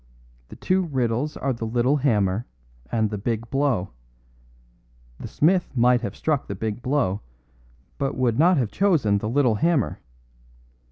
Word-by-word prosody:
The - - -10
two 185 +1 +1
riddles 130 0 -1
are 135 - -1
the 115 -1 -5
little 125 +5 +2
hammer 110 -6 +1 0.4
and 110 -2 0
the 105 - -3
big 115 +2 -3
blow. 135 -9 0 1.3
The - - -6
smith 175 -3 +1
might 120 0 +4
have 100 -4 -5
struck 155 -4 -1
the 100 - -4
big 110 +3 -4
blow, 125 -7 0 0.8
but 135 -1 -2
would 125 -2 +1
not 175 +2 +5
have 120 -6 0
chosen 155 - +2
the 105 - -3
little 130 -2 +2
hammer. 165 -4 +1
125 Hz, 150 wpm, -24 LUFS, 110-145 Hz, 1.3 s, not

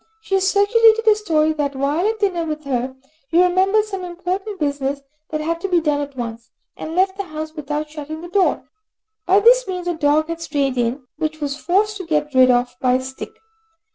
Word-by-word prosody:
She 440 - -7
has 385 0 +3
circulated 450 +2 +4
a 435 - +8
story 315 -7 +1
that, 285 -2 -2
while 290 +8 0
at 445 0 -1
dinner 375 -5 0
with 310 -1 -4
her, 260 -1 -2 0.3
you 345 +2 +4
remembered 380 +4 +3
some 390 -3 -6
important 370 +3 -4
business 280 -1 -1 0.3
that 310 0 -3
had 335 +2 -2
to 390 - -1
be 355 -2 +3
done 300 -3 0
at 285 -1 -6
once, 230 -1 -6 0.3
and 320 - -6
left 380 +1 +2
the 400 - -3
house 310 -1 -6
without 300 0 -4
shutting 310 +1 -7
the 345 - -8
door. 380 +2 +1 0.6
By 385 +2 +5
this - - +5
means 365 -2 -4
a 350 - +1
dog 310 -1 +2
had 335 0 -5
strayed 280 -5 -1
in, 245 +2 -1
which 310 0 -2
she - - -20
was 280 -1 -2
forced 405 +7 0
to 375 -4 -8
get 300 -2 0
rid 255 0 +6
of 245 0 +2
by 250 -1 +3
a 255 - +3
stick. 265 0 -7
315 Hz, 215 wpm, -20 LUFS, 285-380 Hz, 0.6 s, a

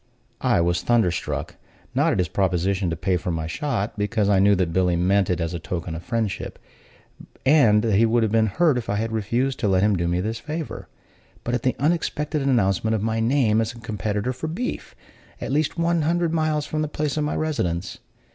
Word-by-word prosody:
I - - +3
was 85 +1 +1
thunder 115 -7 +3
struck, 85 - -4 0.4
not - - +2
at - - 0
his 90 -2 +1
proposition 95 +1 0
to 80 - -2
pay 90 +2 0
for 90 - -4
my 80 -2 -2
shot, 105 - -3
because 105 0 +1
I 100 -2 +4
knew 100 +1 +5
that 90 -3 -1
Billy 90 -1 +2
meant 95 +2 +2
it 90 -2 0
as 85 0 -2
a 85 - -3
token 85 0 -4
of 80 - -5
friendship, 115 -2 -3 0.9
and 120 -7 +5
he 115 0 +3
would 115 +1 +2
have 110 - 0
been 110 0 +3
hurt 150 - +2
if 115 - -8
I 100 - +1
had 110 +2 -2
refused 120 +5 -1
to 110 - 0
let 95 -1 +3
him 105 -1 +3
do 85 -1 -1
me 85 +1 0
this 110 +4 -3
favor; 155 +6 -6 0.6
but 120 - -3
at 120 - 0
the 130 - 0
unexpected 150 0 0
announcement 110 -5 +2
of 105 - -2
my 110 0 0
name 115 -2 +2
as 115 +1 -2
a - - -13
competitor 105 +2 -2
for 130 +6 -5
beef, 225 +11 -4 0.4
at - - -4
least 150 +3 0
one 170 0 +1
hundred 170 +1 +1
miles 155 -2 0
from 155 +1 -2
the 155 - 0
place 150 -1 -2
of 155 - 0
my 150 - -1
residence. 95 - -2
110 Hz, 215 wpm, -23 LUFS, 95-140 Hz, 0.9 s, knew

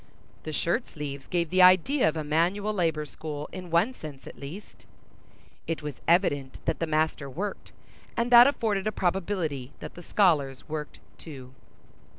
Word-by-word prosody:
The 155 - -4
shirt 170 - 0
sleeves 140 -2 -7
gave 170 -3 -1
the 185 0 +4
idea 185 - +5
of 160 - -4
a 155 - -2
manual 175 +8 +1
labor 165 -5 0
school 150 -1 -6
in 180 -1 -8
one 175 +10 +2
sense 150 - -10
at - - -10
least. 155 +9 -10 0.8
It 165 -2 -3
was 150 -3 -6
evident 145 -7 +2
that - - -1
the 165 - -1
master 155 -2 0
worked, 195 +9 -5 0.5
and 235 +1 0
that 240 +1 +10
afforded 215 -7 0
a - - +1
probability 175 -8 -2
that - - -8
the 175 - -11
scholars 155 -9 +1
worked 150 -1 -6 0.2
too. 130 -5 -10
165 Hz, 165 wpm, -27 LUFS, 150-195 Hz, 0.8 s, that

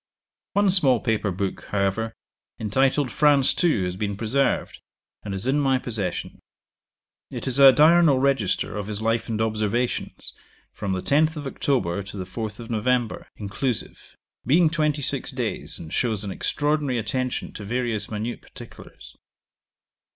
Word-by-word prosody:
One 200 -1 +3
small 135 -10 +5
paper 110 -2 0
book, 95 +1 -3
however, 105 +3 -1 0.5
entitled 130 +5 +1
'FRANCE 145 +2 +3
II,' 150 - +3
has 90 0 -2
been 100 0 -3
preserved, 125 +6 0 0.4
and 105 - -6
is 95 +3 -4
in 135 +3 +2
my 135 -2 +3
possession. 105 -8 -4 0.9
It - - -6
is 130 +1 -1
a 135 -1 +10
diurnal 155 +1 +5
register 130 -10 +1
of 105 -1 -4
his 105 -1 -3
life 115 +1 0
and 110 -1 -2
observations, 110 +2 -1 0.4
from 100 -2 -3
the 95 - -3
10th 155 +2 +2
of 145 - -6
October 120 -9 -1
to 100 +1 -9
the 95 - -3
4th 105 +3 -5
of 115 0 -8
November, 120 +1 0
inclusive, 105 +4 -4 0.3
being 160 +5 +4
twenty 150 -3 0
six - - -1
days, - - -3
and 80 -1 -9
shows 110 -4 0
an 100 - -4
extraordinary 145 +3 0
attention 125 +3 -2
to 105 - -7
various 115 -1 -2
minute 110 +3 -4
particulars. - - -13
115 Hz, 150 wpm, -24 LUFS, 105-140 Hz, 0.9 s, a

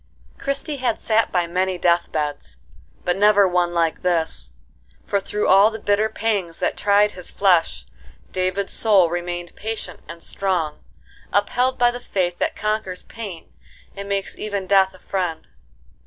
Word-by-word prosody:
Christie 280 +1 -2
had 250 -4 0
sat 225 0 +1
by 175 -2 +1
many 185 +2 -1
death 175 0 +2
beds, 145 - -3 0.5
but 180 - +2
never 205 0 +5
one 175 -1 +1
like 165 -2 0
this; 165 - -1 0.5
for, 200 - +1
through 210 +2 -2
all 195 +3 +7
the 220 - -6
bitter 210 0 +1
pangs 205 -7 -2
that - - 0
tried 205 +1 +3
his 180 -3 -8
flesh, 180 -4 +2 0.5
David's 185 +1 -1
soul 195 -7 +4
remained 175 0 -4
patient 220 -5 -5
and 170 0 -8
strong, 180 -6 -2 0.5
upheld 245 +5 +1
by 240 0 +4
the 245 - -6
faith 180 -7 -2
that - - 0
conquers 215 -3 -2
pain 200 -7 -9 0.4
and 200 0 -7
makes 200 -1 -2
even 200 -2 -3
Death 190 -1 +3
a - - -16
friend. 180 -5 -3
190 Hz, 155 wpm, -22 LUFS, 175-210 Hz, 0.5 s, all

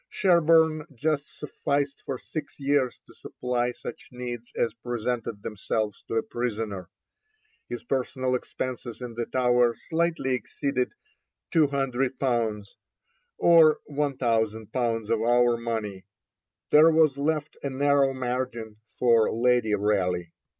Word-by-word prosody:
Sherborne 160 -3 +3
just 150 +2 -1
sufficed 140 -1 -2
for 135 - -2
six 145 +2 -7
years 140 -2 +1
to - - -17
supply 125 -1 -2
such - - -9
needs 120 -1 -6
as 115 - +1
presented 115 -2 -3
themselves 105 0 -2
to - - -3
a 115 - +2
prisoner. 110 -6 -4 0.8
His 120 -1 -5
personal 130 0 -1
expenses 125 -1 -4
in 125 -2 -6
the 120 0 -3
Tower 125 -2 +3
slightly 165 -4 -1
exceeded 130 0 -2 0.6
200_l._, 130 -7 +1 0.7
or 165 -2 +6
1,000_l._ 115 -5 -1
of 115 -1 +2
our 120 +1 +4
money; 110 -5 -4 0.6
there 155 +2 +8
was 155 -4 +3
left 155 +1 -1
a 140 - -2
narrow 140 0 +3
margin 125 -4 -3 0.2
for 115 -3 +4
Lady 120 -2 +2
Raleigh. 95 -4 0
125 Hz, 115 wpm, -26 LUFS, 115-140 Hz, 0.8 s, there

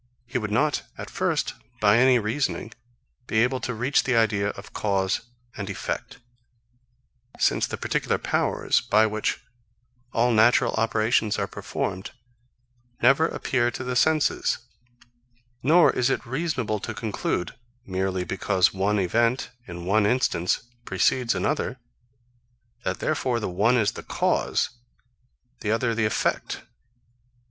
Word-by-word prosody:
He 125 +1 -2
would 105 -2 -3
not, 145 +8 +1 0.2
at - - -7
first, - - 0 0.3
by 105 +1 +5
any 130 0 +6
reasoning, 115 0 -2 0.5
be 110 +1 +3
able 130 +1 0
to 125 +1 -3
reach 125 +6 +2
the 130 - +1
idea 105 -3 +2
of 100 - -9
cause 95 -2 0 0.3
and 100 -1 -5
effect; 95 - -4 1.2
since - - +2
the - - -5
particular - - 0
powers, - - +1
by 110 +1 +4
which 110 0 -1 0.7
all 120 +1 +2
natural 120 +2 +4
operations 110 -1 +1
are - - 0
performed, 95 0 -4 0.9
never 135 +6 +5
appear 120 -6 0
to 125 - -6
the 125 0 -3
senses; 155 +3 +2 1.0
nor 165 +6 +5
is 125 - +1
it - - -1
reasonable 130 -6 -2
to 110 +2 -5
conclude, 105 -4 -2 0.3
merely 95 -1 -1
because 95 0 +1
one 100 +2 +1
event, 115 +7 +1 0.2
in 85 -1 -7
one 100 +2 +3
instance, 105 -7 +1 0.2
precedes 120 +5 +1
another, 145 -3 -1 1.1
that - - -3
therefore 125 -3 0
the 110 - -3
one 105 +7 +2
is 110 -4 +2
the - - -8
cause, - - 0 0.9
the 105 - -3
other 115 +1 +1
the 110 -1 +1
effect. 105 - -1
110 Hz, 130 wpm, -25 LUFS, 100-125 Hz, 1.2 s, any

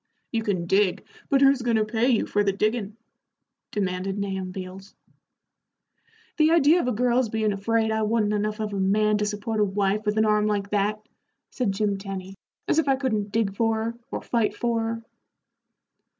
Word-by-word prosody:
"You 230 - 0
can 195 -6 -1
dig, 190 +1 +1 0.2
but 275 -1 +3
who's 275 -1 +5
goin' 235 -1 +1
to 215 -1 +2
pay 225 +3 +1
you 235 -4 +2
for 205 - +1
the 200 - +2
diggin'?" 215 +1 -1 0.7
demanded 190 -1 -2
Nahum 190 -2 -3
Beals. 190 +1 -9 1.4
"The 310 0 +4
idea 330 +1 +5
of 250 - -1
a - - +2
girl's 245 +1 +1
bein' 215 -1 0
afraid 220 +3 0
I 220 0 0
wa'n't 215 -1 +1
enough 210 +1 -1
of 215 -1 -3
a 200 - -2
man 210 +2 +2
to 210 - 0
support 210 +1 -3
a - - +4
wife 200 +1 0
with 210 +1 +1
an 220 - +4
arm 210 0 +2
like 205 -1 -1
that," 210 +1 -1 0.4
said 245 -6 -1
Jim 200 0 -1
Tenny, 195 -1 -6 0.3
"as 315 - +3
if 310 - 0
I 270 - +4
couldn't 215 -7 -2
dig 210 -3 0
for 225 +1 +1
her, 230 +1 -3
or - - -5
fight 230 -3 0
for 235 -1 0
her." 230 0 -3
215 Hz, 190 wpm, -25 LUFS, 200-230 Hz, 1.4 s, who's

